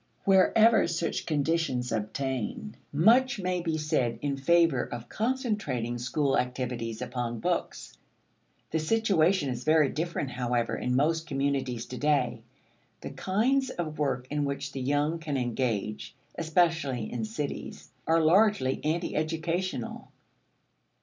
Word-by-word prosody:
Wherever 205 +3 +5
such 170 0 -2
conditions 150 -5 0
obtain, 115 0 -3 0.2
much 235 - +4
may 180 -1 -1
be 165 -2 -1
said 150 -7 0
in 140 -1 0
favor 165 -1 +3
of 120 -1 -7
concentrating 210 - -2
school 135 +3 +1
activity 125 -3 -3
upon 120 -2 -3
books. - - -3 0.8
The 160 - +1
situation 185 -4 +2
is 125 -1 -4
very 155 -1 +4
different, 155 -4 -3
however, 120 -1 -1
in 125 0 -1
most 160 +4 +1
communities 135 -4 -1
to 125 - -7
day. 150 -1 +1 0.6
The - - -6
kinds 255 +8 +1
of 155 -8 -5
work 135 -4 0
in 150 0 0
which 140 0 -3
the 135 - -5
young 145 +5 0
can 150 -3 -3
engage, 115 -4 -2 0.2
especially 160 -7 0
in 120 -2 -2
cities, 115 +7 -5 0.2
are 165 +1 +4
largely 185 -5 +3
anti 165 +3 -1
educational. 165 -1 -2
145 Hz, 125 wpm, -28 LUFS, 125-170 Hz, 0.8 s, Wherever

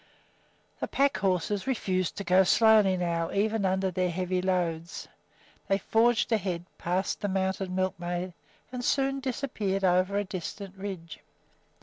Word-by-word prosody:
The - - -2
pack 275 -5 +2
horses 190 +3 0
refused 185 -8 -1
to 200 - -3
go 185 +1 +5
slowly 215 -1 +5
now, 170 -2 -1
even 210 +1 +1
under 190 0 +1
their 180 0 0
heavy 180 +1 -1
loads. 175 -2 -2 0.6
They 195 - +3
forged 230 +3 +2
ahead, 185 -6 -1
passed 185 +2 -1
the 205 - 0
mounted 190 0 -1
milkmaid, 180 -1 -2 0.4
and 250 -1 -5
soon 275 +1 +1
disappeared 230 -7 -2
over 185 +2 +3
a 205 - +1
distant 190 +1 -6
ridge. 190 -4 -7
190 Hz, 135 wpm, -28 LUFS, 180-205 Hz, 0.6 s, go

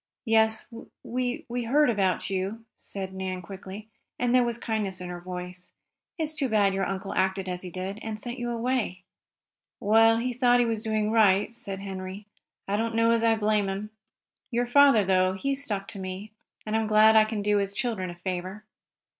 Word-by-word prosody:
"Yes, 220 -1 +3 0.4
we 250 +1 -3
we 240 0 -3
heard 295 +6 +4
about 195 -6 +1
you," 195 +4 -3
said 190 -1 -7
Nan 185 -1 -4
quickly, 195 +3 -9 0.3
and 245 0 +1
there 255 -1 +5
was 235 -1 -1
kindness 215 -5 -2
in 180 -1 -6
her 175 0 -6
voice. 180 0 -8 0.4
"It's 315 -2 -2
too 280 -4 -1
bad 205 -3 +3
your 195 0 0
uncle 195 0 -4
acted 190 0 0
as 180 -1 -4
he 185 - -7
did, 190 +3 -5
and 220 -1 -5
sent 240 +3 -6
you 240 0 -3
away." 235 -6 -1 0.8
"Well, 225 +2 +5
he 250 +2 -1
thought 245 0 +4
he 245 - +4
was 225 -2 -1
doing 215 -1 0
right," 210 -1 +4
said 195 -4 -6
Henry. 190 +1 -6 0.4
"I 200 +1 0
don't 225 +1 -1
know 230 0 +4
as 230 0 +2
I 225 -1 +4
blame 210 -2 +1
him. 200 +2 -4 0.6
Your 245 0 0
father, 260 -4 +5
though, 185 0 +3
he 275 +9 -1
stuck 215 -8 -3
to 200 - -6
me, 190 +3 -6 0.3
and 215 0 -2
I'm 220 -1 +1
glad 215 +1 +6
I 220 - +8
can 215 -1 -3
do 210 0 +2
his 200 0 -1
children 220 -7 -2
a 175 - -7
favor." 185 +3 -5
215 Hz, 195 wpm, -27 LUFS, 190-230 Hz, 0.8 s, I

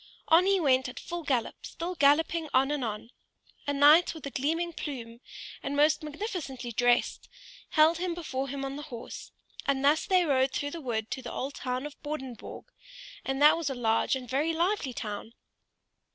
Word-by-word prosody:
On 340 +4 +6
he 395 -1 +4
went 260 -5 +2
at 250 - -8
full 345 0 -5
gallop, 260 -7 -2
still 345 +2 -5
galloping 315 +1 +3
on 270 +2 +4
and 295 -3 -1
on. 220 +1 -5 0.6
A 285 - +1
knight 300 +5 +6
with 315 - -9
a 280 - -5
gleaming 330 +6 -1
plume, 240 -7 -6 0.4
and 280 - -3
most 305 +1 +4
magnificently 300 - -5
dressed, 245 +1 +1 0.4
held 315 +2 +4
him 355 -1 -2
before 275 -6 -3
him 275 +1 -4
on 270 +1 -5
the - - -6
horse, 235 -3 -8 0.4
and 275 0 +1
thus 300 +2 +3
they 365 -2 +4
rode 265 -2 +2
through 285 0 -2
the 335 - -6
wood 225 -5 -3
to 260 - -3
the - - -7
old 275 +2 -4
town 255 0 -3
of 295 -1 -9
Bordingborg, 265 -5 -6 0.6
and 270 0 -2
that 300 - +8
was 330 -3 -2
a 270 - -3
large 225 +1 +1
and 255 -1 -6
very 290 +6 0
lively 345 -3 0
town. 215 0 -6
280 Hz, 185 wpm, -29 LUFS, 255-320 Hz, 0.6 s, that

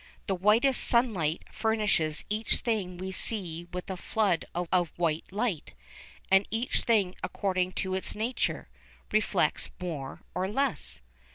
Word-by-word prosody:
The 195 - 0
white 210 +7 +4
sunlight 205 -13 +2
furnishes 210 -9 +1
each 215 +2 +1
thing 200 -6 -1
we 190 +1 -4
see 175 -5 -2
with 180 0 -5
a 190 - -3
flood 185 -2 +1
of 175 0 +1
white 165 -2 +1
light, 200 - -2 0.6
and 195 +1 +6
each 230 +3 0
thing 205 -6 +3
according 185 -2 -1
to 190 -1 -2
its 190 - -2
nature, 230 +4 -1 0.4
reflects 205 -7 +2
more 155 -7 -5
or 185 +1 0
less. 245 - -1
190 Hz, 130 wpm, -29 LUFS, 175-215 Hz, 0.6 s, and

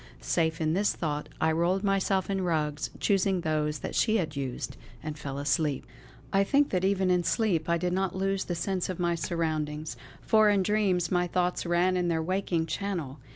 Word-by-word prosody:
Safe 160 - 0
in 155 -1 +1
this 200 +4 +1
thought 150 -3 -3
I 160 - +3
rolled 175 +4 +1
myself 195 -1 +1
in 195 -1 -1
rugs 150 -4 -1
choosing 195 -2 +2
those 155 -1 0
that - - -4
she 220 -1 +3
had 160 -6 -2
used 135 -3 -4 0.3
and 155 -1 -4
fell 140 -2 -6
asleep. 145 0 0 0.5
I 195 0 +4
think 280 +7 +2
that 185 -1 0
even 190 -1 +2
in 180 -1 +2
sleep 175 -5 +1
I 170 - +3
did 180 +1 -1
not 190 0 0
lose 195 0 0
the 175 - -2
sense 185 +2 -2
of 185 - -4
my 175 -1 +1
surroundings, 155 -4 -2 0.2
for 215 -1 +4
in 200 -2 +3
dreams 190 -4 +1
my 180 -1 +2
thoughts 180 0 0
ran 175 +2 +2
in 180 -1 +1
their 165 -1 0
waking 180 -2 0
channel. 165 -5 -3
175 Hz, 195 wpm, -28 LUFS, 155-190 Hz, 0.5 s, I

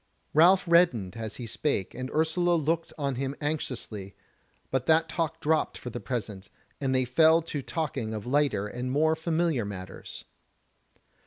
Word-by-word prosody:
Ralph 180 +4 +6
reddened 145 - +3
as 110 -2 -5
he 120 - -6
spake, 110 -4 -1
and 130 +1 -5
Ursula 160 +3 +2
looked 165 +1 0
on 140 -4 -2
him 135 +1 -2
anxiously, 125 -10 -4 0.6
but 130 -1 -1
that 160 +1 +4
talk 165 -1 -2
dropped 155 +1 +1
for 125 - -7
the 120 - -5
present, 105 -7 -5 0.3
and 135 -2 0
they 130 0 +2
fell 160 +6 +5
to 150 -3 -4
talking 135 -7 -3
of 110 -2 -5
lighter 135 -6 +1
and 125 +4 -4
more 155 +3 +3
familiar 160 -5 0
matters. 95 -2 -8
140 Hz, 155 wpm, -28 LUFS, 120-160 Hz, 0.6 s, Ralph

